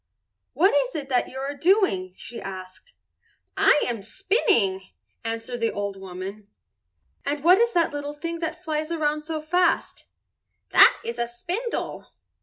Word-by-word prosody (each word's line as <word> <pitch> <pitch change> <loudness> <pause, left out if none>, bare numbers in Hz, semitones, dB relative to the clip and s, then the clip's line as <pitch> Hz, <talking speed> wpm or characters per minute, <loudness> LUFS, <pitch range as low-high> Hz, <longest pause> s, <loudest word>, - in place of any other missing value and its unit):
"What 380 +5 +4
is 265 -3 +1 0.2
that 250 -2 +1
you 265 - -9
are 275 +2 -3
doing?" 290 - +2
she 235 - -8
asked. 190 - -9 0.6
"I 295 - +4
am 235 -4 -2
spinning," 220 - +1 0.4
answered 230 +1 -4
the 230 -1 +1
old 200 -1 -3
woman. 195 +2 -8 0.8
"And 285 0 -2
what 360 +4 +7
is 470 0 +3
that 335 -4 +2
little 290 0 -4
thing 335 +3 -5
that 330 +1 -4
flies 310 -1 -2
around 305 -2 0
so 310 +1 -4
fast?" 350 +4 0 0.7
"That - - +7
is 235 +1 -4
a 235 - 0
spindle." 370 - -4
285 Hz, 145 wpm, -25 LUFS, 225-335 Hz, 0.8 s, what